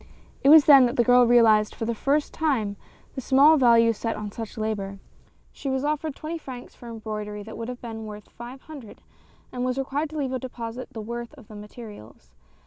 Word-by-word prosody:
It 275 - +5
was 310 -1 +8
then 275 -4 +8
that 240 - -4
the 240 - +3
girl 245 +1 +5
realized, 220 -3 +4
for 225 - -4
the 235 - -1
first 285 +6 -1
time, 245 -11 -1 0.4
the 265 - -5
small 280 +5 +5
value 230 -3 +5
set 225 +1 -4
on 210 -1 -6
such 225 +1 -8
labor. 205 -3 -3 0.5
She 275 - -6
was 265 0 -1
offered 300 0 -2
twenty 325 +2 -6
francs 255 -5 -10
for 240 - -12
embroidery 210 -2 -6
that 220 +1 -10
would 230 0 -6
have 250 0 -8
been 225 -2 -7
worth 210 -1 -10
five 245 +3 -11
hundred, 285 -9 -12 0.5
and 250 -1 -4
was 255 0 -1
required 280 +3 -2
to 310 - -8
leave 275 -3 -2
as 260 - -1
a - - -8
deposit 245 -1 -7
the 225 -4 -7
worth 235 +4 -7
of 250 -7 -17
the 215 - -11
materials. 205 - -12
240 Hz, 215 wpm, -25 LUFS, 220-270 Hz, 0.5 s, was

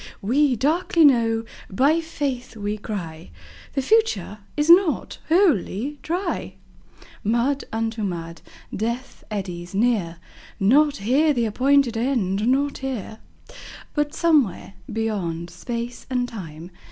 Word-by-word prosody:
We 265 +5 +3
darkly 320 +6 +3
know, 230 -4 +3 0.2
by 280 +11 +3
Faith 275 -7 -4
we 210 0 -3
cry, 165 - -6 0.4
The 270 - -1
future 260 - +1 0.2
is 295 0 +1
not 345 -1 +4
Wholly 290 - +2
Dry. 350 +2 -3 0.7
Mud 240 +6 +1
unto 225 0 -2
mud! 170 -4 -4 0.3
Death 235 +5 -4
eddies 180 -3 -5
near 200 -7 +1 0.4
Not 285 +8 +4
here 280 +9 +2
the 240 -3 +1
appointed 260 +2 +2
End, 225 -4 0
not 280 +3 +1
here! 245 -5 -5 0.7
But 295 0 -1
somewhere, 290 - +2 0.2
beyond 190 -7 -2
Space 235 0 -6
and 250 -1 0
Time. 170 -6 -9
235 Hz, 115 wpm, -23 LUFS, 205-285 Hz, 0.7 s, not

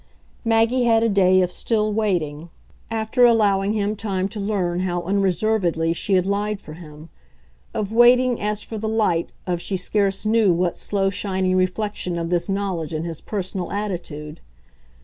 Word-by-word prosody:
Maggie 230 +2 +2
had 225 -1 +4
a 230 - +2
day 185 -2 +4
of 180 - -2
still 215 +1 0
waiting, 170 -7 -1 0.4
after 225 +2 +1
allowing 205 -4 +4
him 210 0 -1
time 195 -3 -2
to 210 - -7
learn 190 -4 -1
how 175 -1 -1
unreservedly 185 -3 +1
she 195 +4 -2
had 185 -1 +3
lied 205 +1 -1
for 155 - -11
him 155 -1 -12 0.7
of 210 0 -2
waiting 245 +1 +5
as 210 0 -1
for 220 - -6
the 220 +1 -2
light 210 -7 0
of 175 -2 -2
she 190 - -2
scarce 195 +2 0
knew 215 -2 +4
what 175 0 0
slow 195 -1 0
shining 190 -2 -1
reflection 185 -1 -1
of 165 0 -3
this 175 +2 0
knowledge 185 -5 -2
in 155 - -2
his 165 -2 -6
personal 190 -3 -4
attitude. 170 -7 -5
195 Hz, 165 wpm, -22 LUFS, 175-215 Hz, 0.7 s, waiting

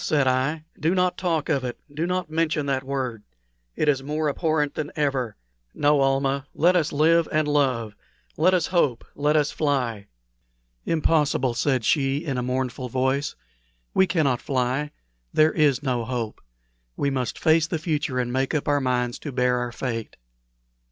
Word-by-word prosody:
said 145 -3 +2
I; 135 +5 +1 0.2
"do 165 +5 +1
not 180 -1 +2
talk 165 -5 -1
of 140 -5 +1
it 125 -1 -4 0.2
do 160 +4 -1
not 180 0 -1
mention 155 -2 0
that 135 -1 -1
word. 130 -5 -3 0.5
It 155 - 0
is 140 -3 +3
more 150 +2 -1
abhorrent 155 -1 0
than 155 -1 -4
ever. 135 -6 -1 0.4
No, 145 0 +3
Almah, 135 0 +1
let 175 +3 +4
us 165 -4 +2
live 165 +3 +3
and 155 -1 +1
love 130 -7 +1 0.4
let 185 +4 +4
us 175 -3 +1
hope 145 -9 +2
let 150 +1 +1
us 150 -1 +2
fly." 125 -9 -1 0.8
"Impossible!" 150 -5 +2
said 125 0 0
she, 135 -2 +2
in 145 -5 -2
a - - -1
mournful 125 0 -2
voice. 130 +3 0 0.6
"We 190 - +4
cannot 140 -9 +1
fly. 135 +1 -1 0.4
There 155 +1 +5
is 145 -4 +2
no 125 -4 0
hope. 115 -3 -4 0.6
We 140 - 0
must 130 -2 -2
face 160 0 +3
the 165 - -2
future, 150 -5 -2
and 125 -1 -1
make 135 +4 0
up 150 - -1
our 145 -1 +2
minds 125 -2 -1
to 145 - -6
bear 125 -1 +1
our 125 0 -3
fate." 115 -2 -4
140 Hz, 170 wpm, -24 LUFS, 130-155 Hz, 0.8 s, There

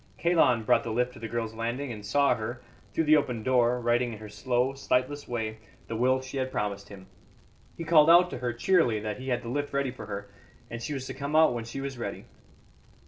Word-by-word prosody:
Kalon 160 -9 +3
brought - - +3
the 115 - -5
lift 125 +3 0
to - - -12
the 115 - -5
girl's 115 0 -3
landing, 120 +4 -3
and 105 -2 -7
saw 140 +7 +3
her, 120 +3 -5 0.3
through 165 - 0
the 155 0 +6
open 125 -6 -2
door, 125 -1 +3
writing 120 0 +1
in - - -7
her 105 0 -10
slow, 125 +4 0
sightless 135 +1 -1
way 110 -2 -3 0.3
the 115 - -5
will 130 +3 +2
she 130 +1 -6
had 130 0 -2
promised 100 -3 -3
him. 95 -2 -11 0.7
He 170 - -4
called 155 -1 +5
out 175 +1 +7
to - - -5
her 125 -1 -1
cheerily 120 - +2
that 105 +2 -4
he 130 - -8
had 120 0 -1
the 115 - -6
lift 145 +3 -3
ready 140 -2 0
for 110 -4 -10
her, 100 -1 -5 0.4
and 115 0 -5
she 145 +5 -3
was 130 -1 -5
to - - -6
come 140 +2 -4
out 160 -4 +6
when 115 -1 -4
she 115 +4 -6
was 135 -2 -5
ready. - - -5
125 Hz, 235 wpm, -28 LUFS, 115-140 Hz, 0.7 s, out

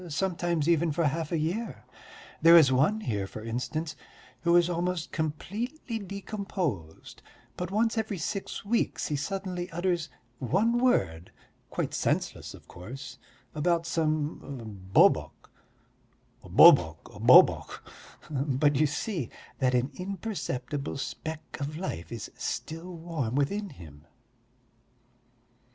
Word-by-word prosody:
sometimes 170 -1 0
even 170 -1 +3
for 165 +3 0
half 155 +2 -1
a 170 - +1
year.... 175 - -3 0.6
There 165 +1 +9
is 145 -5 +7
one 155 +12 +3
here, 105 - -2
for 110 - -9
instance, 125 +8 -3 0.5
who 170 0 +3
is 175 -1 +5
almost 175 -1 -2
completely 220 - -3
decomposed, 190 - -5 0.3
but 180 -1 -4
once 225 +3 +1
every 215 -3 -2
six 195 +4 -4
weeks 230 +3 0
he 150 - 0
suddenly 180 +3 -3
utters 175 -2 -1 0.3
one 210 - +2
word, 90 - +1 0.4
quite - - -3
senseless - - -1
of - - -17
course, 125 +8 -9 0.3
about 165 +2 +1
some 150 - -2
bobok, - - +3 0.9
'Bobok, 80 -3 +6 0.2
bobok,' - - +6 0.5
but 140 0 +1
you 155 +2 +4
see 155 - -3 0.3
that 130 -1 +2
an 125 +3 +1
imperceptible 155 - -4
speck 155 +3 -6
of 145 +2 -4
life 85 - -5
is 115 -3 -6
still 165 +3 -5
warm 160 -8 -3
within 200 +9 0
him." 75 - -13
160 Hz, 115 wpm, -28 LUFS, 135-185 Hz, 0.9 s, There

